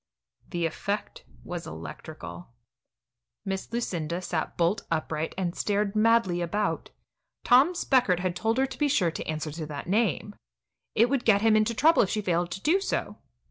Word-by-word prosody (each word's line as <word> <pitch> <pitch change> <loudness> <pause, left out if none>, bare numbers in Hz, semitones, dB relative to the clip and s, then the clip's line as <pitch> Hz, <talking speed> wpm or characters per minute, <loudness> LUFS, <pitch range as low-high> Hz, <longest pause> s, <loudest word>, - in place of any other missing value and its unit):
The 175 -2 -1
effect 200 +6 -4 0.2
was 175 -1 -6
electrical. 85 +1 -8 1.0
Miss 195 +1 -4
Lucinda 175 -8 -2
sat 175 -3 -3
bolt 175 +5 +2
upright 160 -1 -2
and 180 -2 -2
stared 205 0 0
madly 215 -5 +3
about. 205 +5 -1 0.5
Tom 270 +9 +5
Speckert 250 - +3
had 180 -1 -1
told 225 +5 0
her 265 - +3
to 265 - -8
be 295 - +3
sure 200 - +2
to - - -6
answer 155 0 -3
to 155 0 -6
that 145 -2 -6
name. 210 +1 0 0.6
It 230 +2 +5
would 275 -3 +1
get 205 -2 +4
him 220 -1 +5
into 215 +2 +2
trouble 320 +7 +5
if 195 - +1
she 215 - -1
failed 175 -1 0
to 190 +3 -6
do 335 - +3
so. - - -2
195 Hz, 170 wpm, -27 LUFS, 170-230 Hz, 1.0 s, Tom